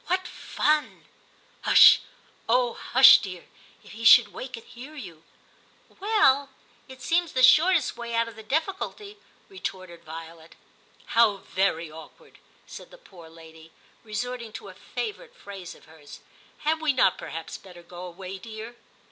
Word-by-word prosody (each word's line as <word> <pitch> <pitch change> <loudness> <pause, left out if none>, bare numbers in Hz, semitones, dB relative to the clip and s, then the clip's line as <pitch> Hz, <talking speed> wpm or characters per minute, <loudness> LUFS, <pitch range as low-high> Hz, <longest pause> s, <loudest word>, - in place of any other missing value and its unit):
* 475 - -29
What 370 +1 -1
fun! 300 0 -2 0.2
' - - -34
* - - -34
Hush, - - +7 0.5
oh! 245 0 +2
hush, 265 +2 +6
dear; 185 -3 -8 0.4
if - - -15
he 225 +2 -10
should 225 -2 +7
wake 255 -2 -8
and 230 - -13
hear 265 +6 -12
you! 175 - -11 0.3
' - - -33
' - - -30
Well? 375 -10 +2 0.4
it 260 -2 -13
seems 340 -1 0
the 255 - +1
shortest 310 +2 +4
way 235 -1 -6
out 230 0 +1
of 230 - -11
the 220 - -11
difficulty,* 390 - -4 0.3
retorted 185 - -8
Violet. 165 0 -11 0.3
* - - -30
How 225 -3 +4
very 170 -4 -2
awkward,' 160 +1 -15 0.3
said - - -12
the - - -16
poor 175 - -16
lady, 160 0 -16 0.3
resorting 235 +2 -5
to - - -9
a - - -12
favourite 465 +2 -7
phrase 195 - -10
of - - -20
hers. 155 -2 -15 0.2
* - - -30
Had 315 +1 0
we 310 -3 +1
not 245 -8 +2
perhaps 165 0 -8
better 180 -2 -15
go 175 +1 -10
away, 185 +2 -9
dear 225 +3 -10
230 Hz, 170 wpm, -25 LUFS, 180-295 Hz, 0.5 s, Hush